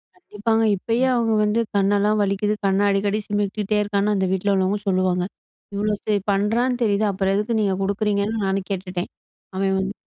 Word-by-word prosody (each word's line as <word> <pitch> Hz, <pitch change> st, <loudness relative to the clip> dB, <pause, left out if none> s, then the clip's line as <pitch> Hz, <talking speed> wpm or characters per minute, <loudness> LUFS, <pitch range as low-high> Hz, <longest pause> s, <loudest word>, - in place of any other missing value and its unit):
கண்டிப்பாங்க. 225 Hz, -, -1 dB
இப்பயே 230 Hz, +6 st, 0 dB
அவுங்க 230 Hz, -2 st, +1 dB
வந்து 210 Hz, +2 st, +1 dB, 0.2 s
கண்ணெல்லாம் 205 Hz, +2 st, +2 dB
வலிக்குது, 200 Hz, +1 st, 0 dB
கண்ண 195 Hz, 0 st, +2 dB
அடிக்கடி 200 Hz, +1 st, +1 dB
சிமிட்டிட்டே 205 Hz, 0 st, -1 dB
இருக்கான்னு 205 Hz, 0 st, 0 dB
அந்த 190 Hz, -1 st, +1 dB
வீட்ல 190 Hz, +1 st, +1 dB
உள்ளவுங்க 190 Hz, +2 st, +1 dB
சொல்லுவாங்க. 185 Hz, -1 st, +1 dB, 0.5 s
இவ்ளோ 210 Hz, +1 st, 0 dB
சரி 210 Hz, -1 st, +1 dB
பண்றான்னு 230 Hz, +5 st, +1 dB
தெரியுது, 210 Hz, -1 st, +2 dB
அப்புறம் 195 Hz, 0 st, 0 dB
எதுக்கு 210 Hz, +3 st, 0 dB
நீங்க 200 Hz, -3 st, +1 dB
கொடுக்குறீங்கன்னு 205 Hz, +2 st, 0 dB
நானும் 195 Hz, 0 st, -1 dB
கேட்டுட்டேன். 180 Hz, -1 st, -4 dB, 0.5 s
அவேன் 195 Hz, 0 st, +1 dB
வந்து 190 Hz, +1 st, -2 dB
205 Hz, 155 wpm, -22 LUFS, 195-215 Hz, 0.5 s, கண்ணெல்லாம்